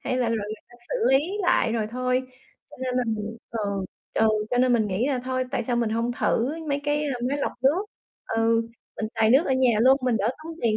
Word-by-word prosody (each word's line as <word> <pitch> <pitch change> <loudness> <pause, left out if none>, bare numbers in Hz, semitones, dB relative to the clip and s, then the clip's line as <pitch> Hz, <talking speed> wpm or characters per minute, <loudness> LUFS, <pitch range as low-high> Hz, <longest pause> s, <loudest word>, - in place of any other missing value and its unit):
Hay 255 - -2
là 245 -2 +1
rồi 230 - +1
người 215 - -4
ta 240 - -19
xử - - -3 0.2
lý 295 +8 +3
lại 350 -9 +2
rồi 225 -2 0
thôi. 255 +1 0 0.5
Cho - - -13
nên 255 -1 -2
là 250 - +2
mình 220 0 -3
ừ, 230 - -4 0.6
ch - - -1
ừ, 220 - +5 0.2
cho 245 - +1
nên 255 0 +4
mình 225 -3 +3
nghĩ 205 +5 0
là 265 - 0
thôi, 255 0 -1
tại 240 - -1
sao 240 +1 -1
mình 230 -2 +1
hông 230 +2 0
thử 240 0 +1 0.2
mấy 285 0 0
cái, 295 0 +1
a, 280 -3 -1
máy 285 - -1
lọc - - -1
nước? 315 +9 +3 0.4
Ừ, 225 0 +2 0.3
mình 220 - -2
xài 220 0 +3
nước 270 +8 +5
ở - - +1
nhà 260 -1 +4
luôn, 260 +3 +6
mình 250 -3 +2
đỡ 210 +2 +1
tốn 330 - -6
tiền 220 -2 +2
245 Hz, 250 wpm, -25 LUFS, 225-265 Hz, 0.6 s, luôn